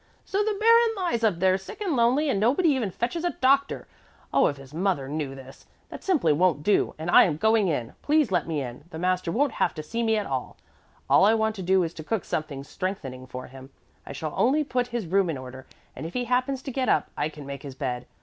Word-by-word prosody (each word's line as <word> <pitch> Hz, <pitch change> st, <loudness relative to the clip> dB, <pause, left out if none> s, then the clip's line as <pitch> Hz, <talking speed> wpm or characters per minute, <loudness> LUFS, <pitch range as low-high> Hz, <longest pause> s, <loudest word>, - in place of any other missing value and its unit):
"So 400 Hz, +2 st, 0 dB
the 420 Hz, -1 st, -1 dB
baron 460 Hz, +1 st, +5 dB
lies 345 Hz, -12 st, -1 dB
up 210 Hz, -6 st, +2 dB
there 185 Hz, +1 st, +2 dB
sick 190 Hz, -, -10 dB
and 380 Hz, -8 st, -1 dB
lonely 250 Hz, +6 st, +3 dB
and 235 Hz, -8 st, +1 dB
nobody 275 Hz, -, +3 dB
even 260 Hz, -8 st, +1 dB
fetches 240 Hz, -, -3 dB
a 350 Hz, -, 0 dB
doctor. 275 Hz, +1 st, +2 dB, 0.5 s
Oh, -, -, +5 dB
if 145 Hz, -, -3 dB
his 135 Hz, +1 st, -13 dB
mother 170 Hz, -5 st, 0 dB
knew 145 Hz, -2 st, -4 dB
this! 135 Hz, 0 st, -13 dB, 0.2 s
That -, -, -9 dB
simply 300 Hz, -, +2 dB
won't 165 Hz, -1 st, +2 dB
do, 205 Hz, -, +2 dB
and 160 Hz, +3 st, -3 dB
I -, -, +8 dB
am 155 Hz, -5 st, -1 dB
going 220 Hz, +2 st, +3 dB
in. 125 Hz, -8 st, -2 dB
Please 295 Hz, -6 st, +2 dB
let 175 Hz, -4 st, +1 dB
me 155 Hz, -4 st, -2 dB
in. 125 Hz, +3 st, -8 dB
The 160 Hz, -, -8 dB
master 180 Hz, 0 st, 0 dB
won't 280 Hz, +9 st, +1 dB
have -, -, 0 dB
to 155 Hz, -, -5 dB
see 230 Hz, +9 st, -3 dB
me 225 Hz, -1 st, +2 dB
at 210 Hz, -, -1 dB
all. 130 Hz, -5 st, -4 dB, 0.5 s
All -, -, +5 dB
I 215 Hz, +3 st, +5 dB
want 220 Hz, 0 st, +1 dB
to -, -, -5 dB
do 185 Hz, +1 st, +3 dB
is 165 Hz, 0 st, -3 dB
to 155 Hz, -, -8 dB
cook 215 Hz, +3 st, -2 dB
something 145 Hz, -3 st, -3 dB
strengthening 140 Hz, -7 st, -5 dB
for 125 Hz, 0 st, -7 dB
him. 130 Hz, +1 st, -12 dB, 0.3 s
I -, -, -9 dB
shall 150 Hz, +2 st, -5 dB
only 285 Hz, +5 st, +3 dB
put 250 Hz, -3 st, -1 dB
his 240 Hz, -4 st, -3 dB
room 190 Hz, +1 st, +2 dB
in 155 Hz, -, -2 dB
order, 130 Hz, 0 st, -10 dB, 0.3 s
and -, -, -7 dB
if 165 Hz, -, -7 dB
he 250 Hz, -, 0 dB
happens 255 Hz, +2 st, 0 dB
to 270 Hz, -, -5 dB
get 260 Hz, 0 st, -1 dB
up, -, -, +1 dB
I 150 Hz, -, -1 dB
can 150 Hz, -2 st, -11 dB
make 140 Hz, -1 st, -7 dB
his 140 Hz, -2 st, -9 dB
bed. 125 Hz, -3 st, -4 dB
190 Hz, 245 wpm, -26 LUFS, -, 0.5 s, I